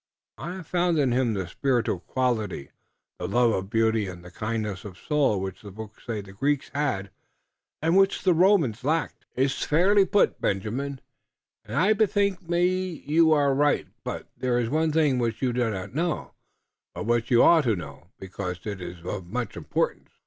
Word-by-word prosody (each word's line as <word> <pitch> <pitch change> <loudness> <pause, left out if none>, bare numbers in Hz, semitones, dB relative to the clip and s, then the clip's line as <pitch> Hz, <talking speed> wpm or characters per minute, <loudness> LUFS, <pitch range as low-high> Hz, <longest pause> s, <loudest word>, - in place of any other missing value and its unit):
I 175 +3 -5
have 185 -3 -8
found 175 0 +1
in 135 -4 +2
him 120 -3 +1
the 95 -2 -2
spiritual 120 - 0
quality, 110 - -2 0.5
the - - -3
love 120 -1 +3
of 95 -2 -2
beauty 110 -1 +2
and 90 -1 -9
the 90 - -11
kindliness 105 -1 -3
of 95 -4 -9
soul 145 -9 +1
which 95 -1 -5
the 105 - -10
books 110 +3 -11
say 110 -3 -2
the 95 -1 -13
Greeks 140 +7 -1
had 130 -10 -1 0.7
and 165 +2 +3
which 195 0 +3
the 185 - +4
Romans 165 - +3
lacked." 155 +1 -1
"It 130 - +2
iss 135 0 -1
fairly 195 +6 +4
put, 200 +2 +2
Benjamin, 125 +8 -2 0.7
und - - -4
I 195 +5 +4
bethink 200 -4 +1
me 180 0 0
you 160 +2 +4
are 145 -2 +3
right. 145 +2 +2
But - - -5
there 125 -1 0
iss 120 -2 0
one 155 +3 +1
thing 150 -5 +2
which 115 -2 -1
you 125 -2 +1
do 120 -1 +1
not 95 +1 -5
know, 165 +2 -2 0.6
but - - -4
which 120 0 +1
you 120 -1 +6
ought 165 -4 +6
to 115 -3 +2
know, 80 -2 -9
because 95 -1 -5
it 100 -3 -5
iss 85 -1 -8
of 95 -1 -4
much 120 +3 -4
importance." - - -2
125 Hz, 185 wpm, -26 LUFS, 105-160 Hz, 0.7 s, you